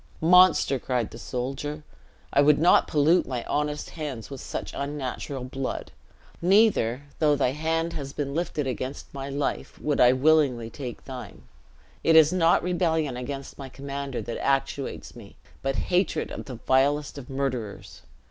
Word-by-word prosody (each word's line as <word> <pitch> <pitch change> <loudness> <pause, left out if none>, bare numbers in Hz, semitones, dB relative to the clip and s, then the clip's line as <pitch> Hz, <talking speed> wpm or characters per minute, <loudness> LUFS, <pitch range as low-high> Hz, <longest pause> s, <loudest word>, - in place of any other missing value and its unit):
"Monster!" 175 -5 +5
cried 125 -4 -2
the - - -10
soldier, 135 +4 -4 0.5
"I 140 - +5
wold 150 0 +5
not 170 +4 +5
pollute 155 +4 +3
my 125 -3 -3
honest 150 0 -2
hands 145 -7 -6
with 135 - -7
such - - -5
unnatural 140 -1 -4
blood. 130 +1 -4 0.5
Neither, 180 - +3 0.2
though 150 -2 +4
thy 125 - +1
hand 165 +3 -1
has 140 -4 -5
been 140 -1 -3
lifted 155 -2 -2
against 130 +1 -5
my 135 0 -5
life, 140 +1 -3
would 150 -1 0
I 125 0 +7
willingly 130 -5 +2
take 130 -4 -7
thine. 125 - -9 0.6
It 165 - +4
is 160 +1 +7
not 170 -2 +3
rebellion 160 -6 0
against 135 +3 -6
my 135 -1 -7
commander 140 0 -5
that 120 - -5
actuates 135 0 -1
me, 105 -4 -13 0.3
but 135 0 -1 0.2
hatred 180 +2 +1
of - - -6
the 130 - -7
vilest 140 +4 +1
of 130 - -11
murderers. 130 -6 -4
140 Hz, 155 wpm, -26 LUFS, 130-155 Hz, 0.6 s, I